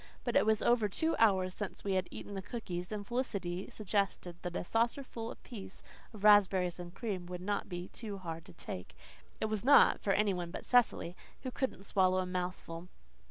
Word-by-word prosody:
But - - -2
it - - +5
was 220 -1 +3
over 230 -3 +4
two 320 +11 +1
hours 190 -4 +4
since 205 -1 -5
we 200 - 0
had 185 -1 +1
eaten 205 - -8
the 195 - -3
cookies, 185 -4 -5
and 210 -1 -4
Felicity 200 -7 -2
suggested 195 -4 -1
that 175 -1 -5
a - - -2
saucerful 230 +1 -1
apiece 200 -6 -9 0.3
of 210 -3 -11
raspberries 190 -4 +5
and 175 0 -7
cream 190 -3 -4
would 180 0 -5
not 200 +3 -2
be 175 0 -4 0.3
hard 165 -3 -5
to - - -13
take. 90 - -7 0.4
It - - 0
was 215 -1 -2
not, 285 +3 +7
for 195 - +2
any 205 -1 +3
one 175 -2 -3
but - - -7
Cecily, 235 -8 +3 0.3
who 255 - -3
couldn't 260 -7 -2
swallow 185 -2 +3
a 185 - +1
mouthful. 180 -1 -4
195 Hz, 190 wpm, -33 LUFS, 180-220 Hz, 0.4 s, not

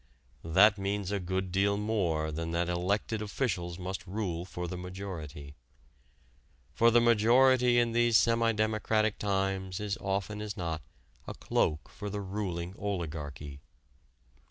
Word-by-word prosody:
That 100 +5 +5
means 100 0 -2
a 100 - 0
good 95 0 -2
deal 100 +2 +2
more 90 -8 0
than 80 +2 -4
that 85 +1 0
elected 100 +5 -1
officials 95 -6 -2
must 95 +1 -5
rule 90 -4 -3
for 90 -1 -5
the 90 - -5
majority. 90 -6 -7 1.2
For 115 - +5
the 120 +1 +5
majority 120 +2 +5
in 120 -1 +3
these 120 -1 +4
semi 115 0 +3
democratic 110 0 0
times 95 -1 -1
is 105 +1 -3
often 100 +2 -2
as 105 0 -5
not 80 -3 -3 0.5
a - - -6
cloak 75 -3 0
for 75 +12 -7
the 105 0 -4
ruling 95 -3 -4
oligarchy. 75 -7 -5
95 Hz, 135 wpm, -30 LUFS, 85-110 Hz, 1.2 s, That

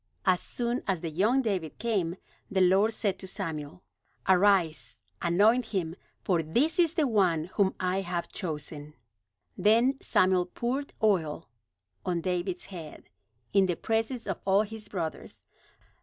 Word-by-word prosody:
As 185 -2 +3
soon 240 +1 -2
as 190 -4 0
the 165 - -4
young 220 - +2
David 185 - -2
came, 195 -7 -1 0.3
the 195 - 0
Lord 190 +4 +4
said 200 -4 -1
to 190 - -8
Samuel: 160 -4 -5 0.4
"Arise, 180 - +3 0.2
anoint 215 +8 +3
him, 175 -6 -2 0.3
for 175 -4 +2
this 270 - +1
is 340 -1 +3
the 315 - +3
one 185 - +1
whom 195 -2 +2
I 185 +1 0
have 175 -2 -3
chosen." 150 -3 -5 0.6
Then 235 +6 +3
Samuel 185 -1 +3
poured 255 +9 -3
oil 165 -7 +1 0.6
on 175 -2 -1
David's 180 +1 -2
head, 165 -6 -10 0.4
in 195 -1 +5
the 175 - 0
presence 225 +4 -1
of 195 -3 -3
all 195 +2 +4
his 215 0 -8
brothers. 165 -5 -5
190 Hz, 140 wpm, -29 LUFS, 170-220 Hz, 0.6 s, in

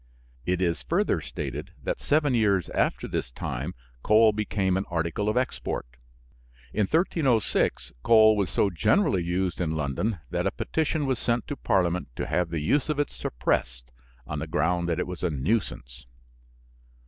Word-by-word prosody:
It 90 +1 +1
is 85 -1 0
further 200 +5 +1
stated - - -6
that - - -2
seven 145 -2 +2
years 100 -7 +2
after - - 0
this - - -3
time 70 +6 -5 0.3
coal 110 - +5
became 100 -3 0
an 95 +1 -1
article 85 +5 -1
of 110 - 0
export. 130 - -2 0.9
In 105 -2 +1
1306 150 - +1
coal 110 - +6
was 100 -3 0
so 100 - +1
generally 95 - +2
used 90 +1 -1
in 80 -2 -1
London 80 - -1
that - - 0
a - - 0
petition 155 -1 -1
was 130 -3 0
sent 120 -1 0
to 145 - -4
parliament 90 -7 +1
to - - -3
have 90 -1 0
the 85 -2 -2
use 145 - +1
of 150 - 0
it 145 - 0
suppressed - - -2 0.3
on - - -4
the - - -4
ground 85 +2 0
that 85 - 0
it - - -1
was 90 -1 -7
a 90 - +1
nuisance. 70 - -2
95 Hz, 165 wpm, -26 LUFS, 85-115 Hz, 0.9 s, coal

